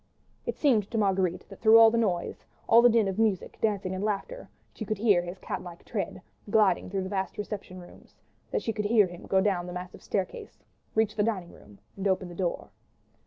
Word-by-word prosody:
It - - -2
seemed 225 -9 +2
to 230 - -3
Marguerite 190 -4 0
that 195 - -12
through 225 0 +7
all 225 -1 +8
the 235 - 0
noise, 185 -6 -1 0.2
all 230 +1 +7
the 245 - +7
din 225 -3 +3
of 195 +2 -3
music, 215 -5 0
dancing, 200 -4 0
and 190 +1 -3
laughter, 215 - -3 0.2
she - - -6
could 215 0 -3
hear 205 -4 +4
his 175 +2 -7
cat 185 - -5
like 175 -2 -11
tread, - - -4 0.3
gliding 210 -3 +3
through 195 0 -2
the - - -4
vast 190 -1 -3
reception 200 -3 -6
rooms; 175 - -16 0.3
that - - -2
she 225 - -1
could 210 -1 -3
hear 215 -1 +5
him 175 -1 -10
go 190 -1 +3
down 190 -3 0
the 180 - -6
massive 180 0 -8
staircase, 190 -2 -4 0.3
reach 220 -1 +2
the - - +2
dining 205 -5 -1
room 105 -1 -17 0.2
and 195 0 -2
open 190 -1 0
the - - -9
door. 180 -2 -3
195 Hz, 215 wpm, -28 LUFS, 185-220 Hz, 0.3 s, all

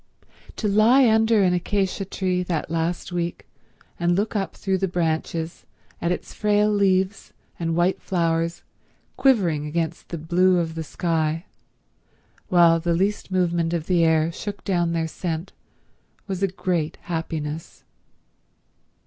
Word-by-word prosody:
To 215 - -2
lie 230 +6 +5
under 220 -1 +4
an 180 -1 +3
acacia 195 +2 -1
tree 185 -1 -1
that 170 -3 -3
last 165 +2 -2
week 175 -1 -3 0.5
and 175 0 +2
look 210 +4 -1
up 195 -2 -2
through 190 -1 -1
the 195 - +1
branches 165 -1 -2 0.4
at 170 - 0
its 180 - -4
frail 210 0 +2
leaves 195 -1 +1 0.3
and 165 -1 -1
white 175 +2 +1
flowers 170 -1 -1 0.5
quivering 175 - +2
against 165 +1 -3
the 170 - -4
blue 180 +4 +3
of 165 -2 -1
the 160 0 -4
sky, 160 +1 -1 1.0
while 170 -2 +5
the 170 0 0
least 195 +4 -1
movement 175 -3 +1
of 165 -2 -1
the 175 -2 +2
air 160 0 +3
shook 205 +4 -6
down 175 -3 0
their 165 -1 0
scent, 165 +2 -4 0.7
was 190 -2 -4
a 195 - +3
great 175 -4 -2
happiness. 160 -2 -5
175 Hz, 140 wpm, -23 LUFS, 165-190 Hz, 1.0 s, lie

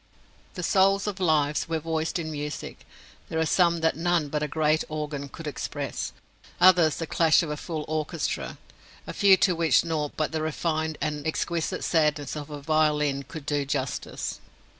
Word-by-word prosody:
If - - -30
the 180 - -4
souls 195 +2 +3
of 205 -2 -3
lives 155 -4 +1
were 165 - 0
voiced 160 +1 -2
in 160 -2 -4
music, 150 0 -6 0.4
there 160 - -3
are 160 - +2
some 170 0 +3
that 160 - +2
none 165 -2 +1
but 150 +1 -1
a 150 - 0
great 155 +1 +1
organ 150 -2 -4
could 165 - -9
express, 150 -3 -4 0.5
others 175 -4 +6
the 165 - -3
clash 165 +1 +4
of 155 - -4
a - - -2
full 155 0 -5
orchestra, 155 -1 -2 0.5
a - - -6
few 195 -2 +6
to 185 - +2
which 165 0 +3
nought 155 -3 -2
but 155 - 0
the 160 -1 -2
refined 155 0 -1
and 150 0 -2
exquisite 170 +3 -2
sadness 150 -4 +1
of 150 -1 -6
a 145 -1 -7
violin 150 -2 +2
could 145 +1 -9
do 145 -1 0
justice. 135 -2 -3
155 Hz, 180 wpm, -26 LUFS, 150-165 Hz, 0.5 s, others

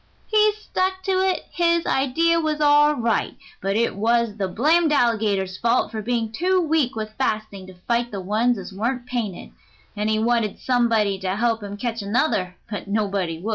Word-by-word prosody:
"He 425 -1 +3
stuck 375 -3 -2
to 375 -1 +1
it 380 -1 0
his 340 -1 +1
idea 330 +6 +2
was 310 -2 -1
all 295 0 +5
right, 235 -3 -1 0.3
but 195 +1 -1
it 230 -2 +1
was 230 +1 +1
the 195 -2 -1
blamed 310 - +2
alligator's 210 -8 +1
fault 230 -2 +1
for 220 -1 -4
being 230 0 -1
too 370 +10 +1
weak 315 -7 +1
with 215 -1 -5
fasting 215 -3 -2
to 185 - -12
fight 235 0 +1
the 200 - -5
ones 215 +6 +1
as 195 0 -8
weren't 240 +5 -2
painted, 235 -7 -4 0.4
and 210 +1 -1
he 215 - +1
wanted 225 -2 0
somebody 225 -6 +1
to 190 0 -2
help 230 +1 0
him 205 0 -7
catch 230 0 -3
another, 200 -3 0
but 205 -1 -6
nobody 200 -5 -1
would." 205 +6 -5
230 Hz, 180 wpm, -22 LUFS, 205-295 Hz, 0.4 s, all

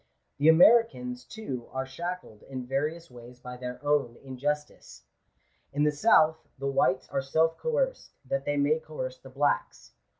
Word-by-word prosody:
The 150 +3 +5
Americans, 235 +8 +5
too, 135 - -7
are 130 0 -2
shackled 170 -5 -6
in 130 -2 -5
various 150 +5 -2
ways 120 0 -13
by 125 0 -8
their 125 0 -6
own 145 -5 +1
injustice. 135 - -4 0.7
In 145 +1 +1
the 150 - +4
south, 160 -1 +4 0.2
the 135 - -6
whites 130 -1 +1
are - - -1
self 160 +4 +1
coerced, - - -1 0.2
that 135 +1 -2
they 145 0 -1
may 145 +3 +2
coerce 130 -5 -6
the 135 - -13
blacks. 140 +2 -1
145 Hz, 155 wpm, -28 LUFS, 130-160 Hz, 0.7 s, The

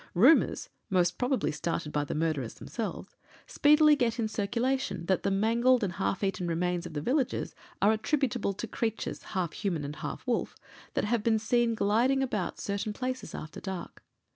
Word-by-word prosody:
Rumours 255 - +5 0.2
(most 180 -3 +2
probably 255 - +1
started 150 0 -3
by 150 -1 0
the - - -4
murderers 150 -7 -1
themselves) 225 -3 -6 0.3
speedily 300 +1 +5
get 240 -4 0
in 230 -2 0
circulation 230 -1 -1
that 190 +1 +1
the - - 0
mangled 230 +5 +3
and 185 -3 -1
half 100 - -1
eaten 185 -2 -1
remains 175 +1 -1
of - - -10
the 145 - -1
villagers 260 - 0 0.3
are 205 - +6
attributable 220 -1 0
to 205 - -5
creatures, 225 0 -3
half 185 -5 -3
human 175 -8 -2
and 150 +2 -6
half - - -6
wolf, 245 -2 -1 0.4
that - - +1
have 230 +1 +1
been 220 +1 +3
seen 230 +1 +1
gliding 240 +7 +2
about 210 -9 -2
certain 200 +1 -2
places 255 +3 -4
after 155 - -7
dark. 190 -3 -6
210 Hz, 170 wpm, -29 LUFS, 175-245 Hz, 0.4 s, are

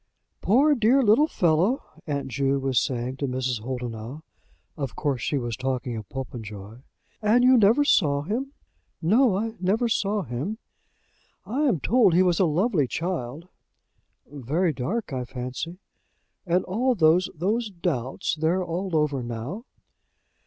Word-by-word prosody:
"Poor 275 +9 +4
dear 255 +2 +3
little 235 +8 +5
fellow!" 180 - +1 0.2
aunt 140 -2 -2
Ju 135 +1 0
was 135 -3 +1
saying 125 +1 -3
to 140 - -2
Mrs. 125 -2 -2
Holdenough. 120 +3 -6 0.5
Of 140 -5 -5
course 140 -5 -1
she 145 - -1
was 120 -3 -3
talking 130 0 -3
of 110 -3 -7
Popenjoy. 110 -4 -8 0.4
"And 220 +4 +4
you 255 +1 +6
never 230 +5 +5
saw 145 - +3
him?" 240 - -3 0.5
"No; 210 +4 +3
I 225 +2 -2
never 205 +7 +1
saw 205 -2 0
him." 145 - -4 0.9
"I 275 +7 -1
am 205 - +1
told 215 - +3
he 185 - +5
was 175 -2 +2
a 190 - +4
lovely 165 - +1
child." 165 -1 -4 0.8
"Very 150 +6 -1
dark, 165 - -3
I 130 -1 -2
fancy." 130 +7 -6 0.7
"And 175 +2 +1
all 245 +7 +1
those 175 0 +4
those 210 +8 -1
doubts? 165 - -2
They're 160 +4 0
all 175 +1 -3
over 150 -3 +1
now?" 120 - -6
160 Hz, 145 wpm, -25 LUFS, 130-210 Hz, 0.9 s, you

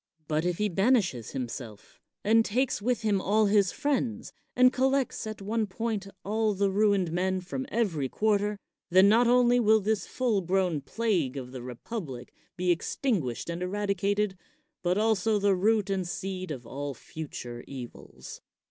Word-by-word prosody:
But 155 +2 0
if 180 -1 0
he 210 - +1
banishes 195 - +1
himself, 120 -4 -7 0.2
and 225 +2 +5
takes 245 +2 0
with 240 +1 0
him 205 -3 +2
all 215 +3 +3
his 200 -2 +3
friends, 245 -6 -2 0.2
and 255 0 +6
collects 265 -3 0
at 215 -2 -6
one 220 +1 -1
point 210 0 -3 0.2
all 215 +1 +1
the 195 0 +1
ruined 200 -4 +2
men 185 +2 0
from 185 +9 -5
every 175 - 0
quarter, 210 +1 +1 0.3
then 185 +2 +6
not 230 +4 +5
only 245 0 +5
will 220 -1 +5
this 210 0 -1
full 235 -6 0
grown 180 -3 0
plague 175 - -1
of 125 -2 -6
the 130 -1 -7
republic 125 - -7 0.2
be 180 0 +2
extinguished 170 - -1
and 170 +1 -4
eradicated, 200 +1 0 0.5
but 180 +1 +1
also 220 -1 +2
the 200 -1 +3
root 210 +2 +2
and 190 -2 -1
seed 185 0 -4
of 130 -6 -6
all 140 +3 -5
future 120 -5 -8
evils. 125 -3 -9
200 Hz, 155 wpm, -28 LUFS, 170-220 Hz, 0.5 s, and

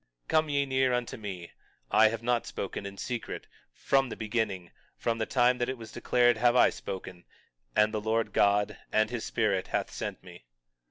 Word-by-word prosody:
20:16 - - -45
Come 155 -1 +3
ye 140 -1 +1
near 130 -1 +2
unto 125 -1 -2
me; 95 -6 -7 0.4
I 110 +1 +6
have 115 +1 -3
not 120 -1 +1
spoken 100 0 -5
in 100 0 -9
secret; 120 +1 -5 0.3
from 135 -2 +1
the - - -5
beginning, 105 -5 -2 0.3
from 115 -1 -1
the 110 - -1
time 125 0 +3
that 120 +1 0
it 130 - -3
was 110 -2 -10
declared 120 -2 +3
have 120 +2 +3
I - - +6
spoken; 95 -2 -7 0.5
and 105 +1 +4
the 110 - -1
Lord 110 +1 0
God, 100 0 +2
and 110 +1 +2
his 120 -2 -3
Spirit, 100 -5 0
hath - - -2
sent - - -5
me. - - -13
115 Hz, 195 wpm, -29 LUFS, 105-125 Hz, 0.5 s, I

